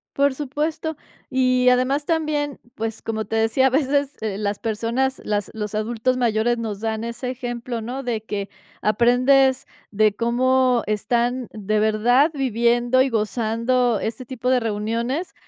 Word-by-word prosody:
Por 280 Hz, 0 st, +3 dB
supuesto 300 Hz, +3 st, -3 dB, 0.3 s
y, 255 Hz, -1 st, +3 dB
además, 255 Hz, +4 st, +2 dB
también, 300 Hz, -3 st, -1 dB, 0.2 s
pues, 225 Hz, 0 st, -4 dB
como 220 Hz, -1 st, -3 dB
te 225 Hz, -, -3 dB
decía, 225 Hz, +4 st, +3 dB
a -, -, +3 dB
veces, 280 Hz, +1 st, 0 dB
eh, 210 Hz, -3 st, -2 dB
las 205 Hz, -1 st, -2 dB
personas, 235 Hz, +4 st, -1 dB
las 205 Hz, -1 st, -1 dB
los 210 Hz, -1 st, -5 dB
adultos 230 Hz, +4 st, 0 dB
mayores 240 Hz, 0 st, +1 dB
nos 215 Hz, -3 st, -4 dB
dan 220 Hz, 0 st, -2 dB
ese 240 Hz, +2 st, -4 dB
ejemplo, 240 Hz, -1 st, -5 dB
¿no?, 250 Hz, +5 st, -5 dB
de 235 Hz, -3 st, -2 dB
que 200 Hz, -2 st, -4 dB, 0.3 s
aprendes 255 Hz, +4 st, +3 dB, 0.3 s
de 215 Hz, 0 st, +3 dB
cómo 250 Hz, +2 st, +2 dB
están 240 Hz, +4 st, 0 dB
de 215 Hz, 0 st, -1 dB
verdad 230 Hz, +7 st, +3 dB
viviendo 240 Hz, -1 st, +2 dB
y 265 Hz, -, +3 dB
gozando 230 Hz, +1 st, 0 dB
este 225 Hz, +3 st, -4 dB
tipo 250 Hz, 0 st, -3 dB
de 255 Hz, -1 st, +4 dB
reuniones, 230 Hz, -, -2 dB
240 Hz, 145 wpm, -22 LUFS, 220-260 Hz, 0.3 s, de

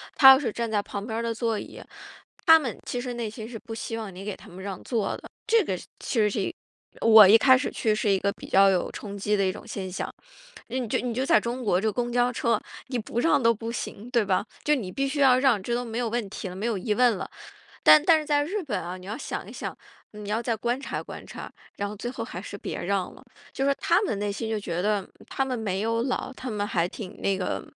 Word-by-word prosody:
他 265 Hz, -, +9 dB
要 265 Hz, -, +7 dB
是 265 Hz, -6 st, -2 dB
站 230 Hz, +1 st, -3 dB
在 210 Hz, -2 st, +2 dB
旁 200 Hz, 0 st, -6 dB
边 220 Hz, -1 st, -4 dB
儿 -, -, -1 dB
的 230 Hz, 0 st, -1 dB
座 225 Hz, -1 st, -1 dB
椅， -, -, -9 dB, 0.7 s
他 325 Hz, 0 st, +9 dB
们 260 Hz, -7 st, -4 dB
其 245 Hz, -, -3 dB
实 250 Hz, -1 st, -4 dB
内 235 Hz, -2 st, -3 dB
心 220 Hz, +1 st, -8 dB
是 240 Hz, -, -6 dB
不 225 Hz, 0 st, -9 dB
希 225 Hz, 0 st, -4 dB
望 215 Hz, -4 st, -6 dB
你 185 Hz, +2 st, -9 dB
给 205 Hz, -1 st, -4 dB
他 -, -, -16 dB
们 185 Hz, +2 st, -10 dB
让 195 Hz, -2 st, -5 dB
座 225 Hz, -5 st, -1 dB
的。 -, -, -12 dB, 0.2 s
这 450 Hz, -1 st, +4 dB
个 190 Hz, -, -2 dB, 0.2 s
其 240 Hz, -, -2 dB
实 210 Hz, -1 st, +4 dB
是 -, -, -1 dB, 0.5 s
这 -, -, -7 dB
我 220 Hz, -3 st, +10 dB
一 210 Hz, +4 st, +8 dB
开 260 Hz, +2 st, +6 dB
始 255 Hz, -, -2 dB
去 220 Hz, -3 st, +1 dB
是 215 Hz, 0 st, 0 dB
一 195 Hz, -1 st, +3 dB
个 200 Hz, +1 st, +1 dB
比 -, -, -11 dB
较 195 Hz, +1 st, +6 dB
有 185 Hz, -2 st, +1 dB
冲 205 Hz, -1 st, -7 dB
击 205 Hz, +1 st, 0 dB
的 200 Hz, -, +1 dB
一 185 Hz, -, +1 dB
种 195 Hz, -, -10 dB
现 190 Hz, -2 st, -5 dB
象。 185 Hz, -, -4 dB, 0.5 s
那 245 Hz, -, -4 dB
你 245 Hz, -, -3 dB
就 -, -, 0 dB
你 245 Hz, -1 st, -2 dB
就 260 Hz, +3 st, -1 dB
在 215 Hz, -, +5 dB
中 240 Hz, +3 st, -4 dB
国， 185 Hz, -3 st, +2 dB
这 220 Hz, +1 st, +1 dB
公 240 Hz, +2 st, -2 dB
交 245 Hz, 0 st, +3 dB
车， 230 Hz, -2 st, +1 dB, 0.3 s
你 255 Hz, -2 st, -2 dB
不 225 Hz, +1 st, -3 dB
让 290 Hz, +1 st, +3 dB
都 230 Hz, -1 st, +5 dB
不 225 Hz, +1 st, -5 dB
行， 230 Hz, -1 st, -6 dB
对 235 Hz, -3 st, +3 dB
吧？ 195 Hz, 0 st, +1 dB, 0.2 s
就 300 Hz, -, +3 dB
你 205 Hz, -9 st, -4 dB
必 275 Hz, +7 st, -1 dB
须 280 Hz, +2 st, -3 dB
要 260 Hz, -2 st, +6 dB
让， 255 Hz, -6 st, +3 dB
这 235 Hz, -, -2 dB
都 245 Hz, -, -1 dB
没 225 Hz, -1 st, -5 dB
有 245 Hz, -, 0 dB
问 235 Hz, -2 st, -2 dB
题 200 Hz, -, -6 dB
了， 180 Hz, -, -8 dB
没 200 Hz, +4 st, -4 dB
有 230 Hz, -4 st, 0 dB
疑 210 Hz, +3 st, -1 dB
问 240 Hz, -2 st, +3 dB
了。 -, -, -6 dB, 0.6 s
但 305 Hz, -, +9 dB
但 325 Hz, -1 st, +6 dB
是 305 Hz, -, -7 dB
在 290 Hz, -1 st, +2 dB
日 390 Hz, +6 st, -3 dB
本 210 Hz, -10 st, -2 dB
啊， 175 Hz, +2 st, -5 dB
你 185 Hz, 0 st, -12 dB
要 215 Hz, +3 st, -4 dB
想 -, -, -5 dB
一 -, -, -9 dB
想， -, -, -6 dB, 0.4 s
你 210 Hz, -1 st, -9 dB
要 220 Hz, +3 st, 0 dB
再 235 Hz, -1 st, -1 dB
观 240 Hz, +3 st, -1 dB
察 -, -, -4 dB
观 -, -, -9 dB
察， -, -, -8 dB, 0.3 s
然 205 Hz, -, -2 dB
后 210 Hz, -, -6 dB
最 240 Hz, +4 st, -4 dB
后 230 Hz, -2 st, -5 dB
还 185 Hz, -6 st, -7 dB
是 200 Hz, -, -8 dB
别 -, -, -5 dB
让 190 Hz, 0 st, -1 dB
了。 -, -, -16 dB, 0.3 s
就 270 Hz, -, -2 dB
说 280 Hz, -, +4 dB
他 345 Hz, +3 st, +3 dB
们 285 Hz, -, -1 dB
内 205 Hz, 0 st, -1 dB
心 220 Hz, +3 st, -4 dB
就 220 Hz, -, 0 dB
觉 175 Hz, -3 st, -3 dB
得 205 Hz, -1 st, 0 dB, 0.2 s
他 270 Hz, -, 0 dB
们 260 Hz, -2 st, -2 dB
没 200 Hz, -3 st, -2 dB
有 230 Hz, +1 st, 0 dB
老， 255 Hz, 0 st, -2 dB
他 255 Hz, 0 st, -6 dB
们 205 Hz, -2 st, -2 dB
还 175 Hz, -4 st, 0 dB
挺 195 Hz, 0 st, -9 dB
那 195 Hz, -1 st, +1 dB
个 185 Hz, -, -2 dB
225 Hz, 300 characters per minute, -26 LUFS, 200-245 Hz, 0.7 s, 我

